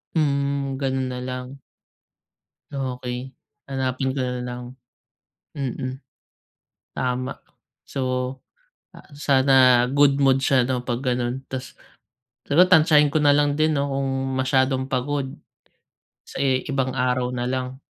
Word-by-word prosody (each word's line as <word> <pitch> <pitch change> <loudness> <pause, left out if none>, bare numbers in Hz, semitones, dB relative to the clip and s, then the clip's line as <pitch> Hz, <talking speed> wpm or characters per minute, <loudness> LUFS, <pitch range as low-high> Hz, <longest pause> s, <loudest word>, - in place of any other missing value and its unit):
Hmm. 140 -2 0
Ganun 130 -1 -1
nalang. 125 +1 -6 1.1
Okey. 125 -1 -5 0.3
Hanapin 130 0 -2
ko 135 - -1
na 125 0 -3
lang. 125 0 -5 0.9
Mm. 130 -2 -4 0.9
Tama. 125 0 -3 0.5
So, 140 - -5 0.9
ah - - -14
sana 130 -3 +5
good 140 0 +4
mood 135 -1 +4
siya 135 -2 +4
'no, 125 -1 -2
'pag 120 0 -2
ganun. 125 0 -1
Tapos 130 -1 -6 0.7
pero 165 +8 +4
tantsahin 155 -4 +5
ko - - +4
na 145 - +5
lang 145 0 +2
din 155 0 +2
'no, 140 - 0
kung 135 -1 -1
masyadong 130 0 +1
pagod. 135 +1 -1 1.0
Sa - - -6
i 130 -2 +1
ibang 135 -3 -1
araw 125 0 +1
na 125 -1 -3
lang. 130 0 -3
130 Hz, 120 wpm, -23 LUFS, 125-140 Hz, 1.1 s, sana